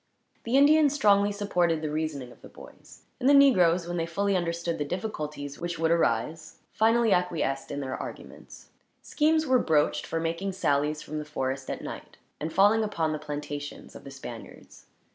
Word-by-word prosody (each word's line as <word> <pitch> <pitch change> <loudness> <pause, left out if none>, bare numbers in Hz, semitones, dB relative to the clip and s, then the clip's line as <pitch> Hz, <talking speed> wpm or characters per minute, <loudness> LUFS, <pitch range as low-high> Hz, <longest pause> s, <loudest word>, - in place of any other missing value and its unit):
The 240 +3 +2
Indians 290 0 +5
strongly 205 -6 +4
supported 175 -6 0
the 150 - -2
reasoning 150 -5 -3
of - - -18
the - - -13
boys, - - -15 0.2
and 260 +1 +2
the 285 - +7
negroes, 185 -11 +5
when 175 0 -3
they 165 0 -1
fully 200 +4 0
understood 170 -1 -2
the - - 0
difficulties 150 -5 -5
which 175 0 -4
would 160 0 +1
arise, 155 +1 0
finally 225 0 +3
acquiesced 165 -6 -1
in 145 0 -4
their 130 -1 -4
arguments. - - -10 0.3
Schemes 315 +1 +1
were 260 -3 +3
broached 155 -7 +1
for 165 - -2
making 165 +4 -2
sallies 150 -3 0
from 155 0 -5
the - - -4
forest, 135 -3 -4
at - - -5
night, - - -9 0.2
and 155 +2 -4
falling 205 +5 +4
upon 170 -7 -1
the 155 - -3
plantations 145 -1 -7
of - - -11
the 140 - -9
Spaniards. 130 -4 -11
165 Hz, 180 wpm, -27 LUFS, 150-205 Hz, 0.3 s, the